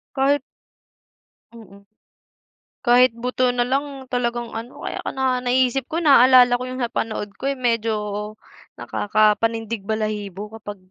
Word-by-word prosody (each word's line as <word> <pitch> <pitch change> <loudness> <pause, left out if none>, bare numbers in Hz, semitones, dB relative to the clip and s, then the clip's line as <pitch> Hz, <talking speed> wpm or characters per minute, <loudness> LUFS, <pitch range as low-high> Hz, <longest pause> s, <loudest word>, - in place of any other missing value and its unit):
Kahit 275 +1 +2 1.1
Mm. 200 -3 -15 1.0
Kahit 245 -1 +5
buto 250 +1 0
na 245 0 0
lang 275 +1 -3
talagang 240 -1 -2
ano, 230 +2 -8
kaya - - -4
ka - - -4
na 260 -1 0
naiisip 255 +1 +1
ko, 320 - -2
naaalala 255 -5 +6
ko 245 +1 0
yung 255 - -6
napanood 225 -4 -3
ko, 270 +6 -3
yung 270 -2 -5
medyo 230 -2 +1 0.8
nakakapanindig-balahibo 215 -1 -1
kapag 205 0 -7
240 Hz, 120 wpm, -22 LUFS, 220-255 Hz, 1.1 s, naaalala